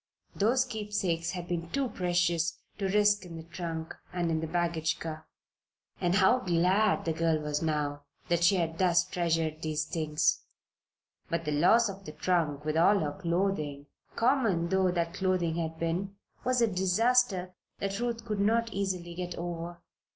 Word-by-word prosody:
Those 245 Hz, +6 st, +3 dB
keepsakes 205 Hz, -8 st, -2 dB
had 175 Hz, -2 st, -5 dB
been 170 Hz, -1 st, -3 dB
too 275 Hz, +4 st, 0 dB
precious 175 Hz, -3 st, 0 dB, 0.2 s
to 195 Hz, -, 0 dB
risk 205 Hz, 0 st, +3 dB
in 170 Hz, -2 st, -9 dB
the 160 Hz, -, -8 dB
trunk 165 Hz, -1 st, -5 dB, 0.2 s
and 175 Hz, -2 st, -1 dB
in 160 Hz, -, +1 dB
the 160 Hz, -, -3 dB
baggage 165 Hz, -1 st, 0 dB
car. 160 Hz, -1 st, -6 dB, 0.7 s
And 175 Hz, 0 st, +1 dB
how 200 Hz, +6 st, +5 dB
glad 185 Hz, +2 st, +2 dB
the 165 Hz, -, 0 dB
girl 165 Hz, 0 st, +1 dB
was 150 Hz, -1 st, -2 dB
now 145 Hz, -2 st, -1 dB, 0.2 s
that 170 Hz, 0 st, +1 dB
she 175 Hz, +3 st, +5 dB
had 165 Hz, -2 st, -1 dB
thus 175 Hz, -2 st, +4 dB
treasured 165 Hz, -3 st, -1 dB
these 155 Hz, -1 st, -1 dB
things. 155 Hz, -2 st, 0 dB, 0.9 s
But 165 Hz, 0 st, -2 dB
the 150 Hz, -, -1 dB
loss 180 Hz, +11 st, +5 dB
of 195 Hz, -1 st, -8 dB
the 155 Hz, -, -7 dB
trunk, 155 Hz, -5 st, 0 dB
with 155 Hz, +1 st, 0 dB
all 195 Hz, +5 st, +5 dB
her 150 Hz, -5 st, -1 dB
clothing 170 Hz, -5 st, -1 dB, 0.3 s
common 230 Hz, -9 st, +2 dB
though 190 Hz, 0 st, +3 dB
that 170 Hz, -1 st, -1 dB
clothing 180 Hz, -3 st, 0 dB
had 160 Hz, -1 st, -3 dB
been 175 Hz, +4 st, -2 dB, 0.3 s
was 250 Hz, -1 st, +2 dB
a -, -, +5 dB
disaster 190 Hz, 0 st, +2 dB, 0.2 s
that 195 Hz, +1 st, -3 dB
Ruth 235 Hz, -1 st, -2 dB
could 210 Hz, -3 st, -2 dB
not 225 Hz, +2 st, +2 dB
easily 185 Hz, -3 st, -2 dB
get 180 Hz, 0 st, -5 dB
over. 170 Hz, 0 st, -5 dB
175 Hz, 165 wpm, -30 LUFS, 165-195 Hz, 0.9 s, how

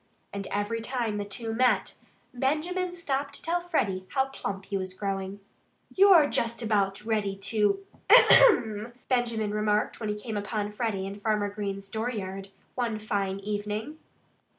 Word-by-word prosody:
And 200 Hz, -1 st, -4 dB
every 205 Hz, +3 st, -2 dB
time 230 Hz, -3 st, -2 dB
the 205 Hz, -, -3 dB
two 225 Hz, +3 st, -4 dB
met, 250 Hz, +2 st, +2 dB, 0.4 s
Benjamin 340 Hz, +8 st, -1 dB
stopped 280 Hz, -4 st, -2 dB
to -, -, -6 dB
tell 345 Hz, +2 st, 0 dB
Freddie 200 Hz, -, -1 dB
how 265 Hz, 0 st, +2 dB
plump 195 Hz, -7 st, -5 dB
he 200 Hz, -, -4 dB
was 185 Hz, -1 st, -3 dB
growing. 195 Hz, 0 st, -4 dB, 0.5 s
"You're 375 Hz, -6 st, +7 dB
just 235 Hz, -2 st, -1 dB
about 205 Hz, -2 st, 0 dB
ready 210 Hz, -3 st, 0 dB
to 200 Hz, 0 st, 0 dB, 0.2 s
AHEM!" 240 Hz, -, +6 dB, 0.2 s
Benjamin 235 Hz, -4 st, 0 dB
remarked 210 Hz, 0 st, 0 dB
when 215 Hz, -, -3 dB
he 210 Hz, -, -1 dB
came 215 Hz, 0 st, -5 dB
upon 205 Hz, 0 st, -3 dB
Freddie 210 Hz, -3 st, -2 dB
in 200 Hz, +1 st, -6 dB
Farmer 210 Hz, -1 st, 0 dB
Green's 200 Hz, -1 st, -5 dB
dooryard 200 Hz, -4 st, -4 dB, 0.2 s
one 235 Hz, -4 st, -1 dB
fine 200 Hz, -3 st, -2 dB
evening. 210 Hz, +8 st, -4 dB
215 Hz, 150 wpm, -28 LUFS, 200-245 Hz, 0.5 s, You're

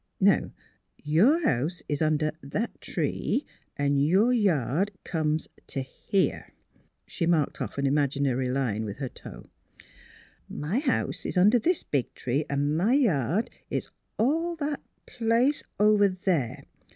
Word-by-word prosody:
Now -, -, +3 dB, 0.5 s
your 215 Hz, -, +4 dB
house 150 Hz, +8 st, 0 dB
is 145 Hz, 0 st, -2 dB
under 155 Hz, 0 st, +2 dB
that 205 Hz, +12 st, -4 dB
tree, 285 Hz, -, -1 dB, 0.3 s
an' 140 Hz, 0 st, +1 dB
your 190 Hz, -, +4 dB
yard 185 Hz, -, +1 dB, 0.2 s
conies 155 Hz, -1 st, -1 dB, 0.2 s
to 135 Hz, -, -3 dB
here." 190 Hz, +8 st, -2 dB, 0.5 s
She 170 Hz, -, -2 dB
marked 160 Hz, -4 st, +1 dB
off -, -, -4 dB
an 140 Hz, -, 0 dB
imaginary 135 Hz, -2 st, +1 dB
Hne 125 Hz, -5 st, -1 dB
with 105 Hz, -2 st, -5 dB
her 135 Hz, -3 st, -4 dB
toe. -, -, -11 dB, 0.3 s
* -, -, -22 dB
' -, -, -34 dB, 0.2 s
My 205 Hz, +11 st, +1 dB
house 275 Hz, -3 st, -1 dB
is -, -, -3 dB
under 210 Hz, +7 st, +5 dB
this 340 Hz, +9 st, +1 dB
big 140 Hz, -4 st, -1 dB
tree, 135 Hz, +5 st, -1 dB
and 145 Hz, +1 st, 0 dB
my 195 Hz, +9 st, +2 dB
yard 190 Hz, -, +1 dB, 0.2 s
is -, -, -3 dB, 0.3 s
all 325 Hz, +9 st, +1 dB
that 295 Hz, -2 st, -3 dB, 0.2 s
place 240 Hz, +5 st, +1 dB, 0.2 s
over 210 Hz, -1 st, +5 dB
there. 180 Hz, -, -1 dB
160 Hz, 140 wpm, -27 LUFS, 140-225 Hz, 0.5 s, under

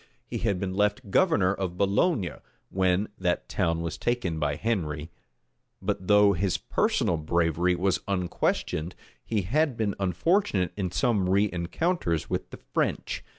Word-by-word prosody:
He -, -, -4 dB
had 100 Hz, -5 st, 0 dB
been 95 Hz, -1 st, -2 dB
left 105 Hz, 0 st, 0 dB
governor 100 Hz, -, +3 dB
of 95 Hz, -3 st, -4 dB
Boulogne 100 Hz, -, +1 dB, 0.3 s
when 95 Hz, +2 st, +1 dB
that 90 Hz, -2 st, 0 dB
town 85 Hz, 0 st, 0 dB
was 85 Hz, 0 st, -4 dB
taken 95 Hz, -10 st, -1 dB
by 75 Hz, -1 st, 0 dB
Henry; 80 Hz, -8 st, -2 dB, 0.7 s
but 95 Hz, -2 st, -3 dB
though 105 Hz, -1 st, +6 dB
his 95 Hz, 0 st, 0 dB
personal 85 Hz, -, +1 dB
bravery 85 Hz, +2 st, +1 dB
was 95 Hz, +1 st, +1 dB
unquestioned, 90 Hz, -3 st, -1 dB, 0.3 s
he 105 Hz, -4 st, -1 dB
had 140 Hz, -, +1 dB
been 105 Hz, -3 st, 0 dB
unfortunate 95 Hz, -, +1 dB
in 95 Hz, -3 st, -2 dB
some 105 Hz, -1 st, +1 dB
rencounters[misspelling] 95 Hz, -, 0 dB
with -, -, -2 dB
the -, -, -9 dB
French. -, -, -2 dB
95 Hz, 140 wpm, -27 LUFS, 85-105 Hz, 0.7 s, though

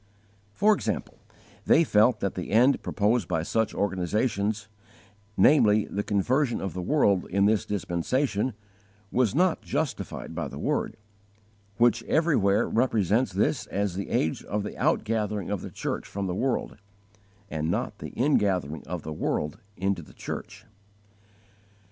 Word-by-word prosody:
For 215 Hz, +2 st, +5 dB
example, -, -, -3 dB, 0.5 s
they 165 Hz, -, +6 dB
felt 110 Hz, -4 st, +3 dB
that 100 Hz, -, -1 dB
the 90 Hz, -, -5 dB
end 125 Hz, +6 st, +4 dB
proposed 110 Hz, +3 st, +1 dB
by 80 Hz, -3 st, -1 dB
such 110 Hz, +5 st, 0 dB
organizations, 100 Hz, +2 st, -1 dB, 0.7 s
namely, 105 Hz, -2 st, +5 dB
the 100 Hz, -, -3 dB
conversion 120 Hz, +6 st, +1 dB
of 95 Hz, -, -4 dB
the 90 Hz, -, -4 dB
world 100 Hz, -5 st, +2 dB
in 100 Hz, +2 st, +2 dB
this 105 Hz, 0 st, +2 dB
dispensation, 105 Hz, -, -1 dB, 0.6 s
was 125 Hz, -2 st, +1 dB
not 180 Hz, +1 st, +2 dB
justified 150 Hz, 0 st, -3 dB
by -, -, -3 dB
the -, -, -9 dB
Word, -, -, -1 dB, 0.8 s
which 120 Hz, 0 st, +4 dB
everywhere 115 Hz, -, +2 dB
represents 115 Hz, -1 st, +1 dB
this -, -, 0 dB
as 100 Hz, -1 st, -1 dB
the 95 Hz, +2 st, -4 dB
age 80 Hz, -, 0 dB
of 105 Hz, +1 st, -2 dB
the 105 Hz, -, -6 dB
outgathering 105 Hz, -3 st, 0 dB
of 100 Hz, -, -3 dB
the -, -, -6 dB
church -, -, -4 dB
from 100 Hz, 0 st, -4 dB
the 90 Hz, -, -2 dB
world, 130 Hz, +7 st, -1 dB, 0.7 s
and 80 Hz, 0 st, -2 dB
not -, -, -2 dB
the -, -, -6 dB
ingathering 95 Hz, -, +1 dB
of 90 Hz, -2 st, -4 dB
the 80 Hz, -, -5 dB
world 75 Hz, +3 st, -2 dB, 0.2 s
into 95 Hz, -1 st, -1 dB
the 75 Hz, -, -15 dB
church. -, -, -7 dB
105 Hz, 140 wpm, -27 LUFS, 95-125 Hz, 0.8 s, they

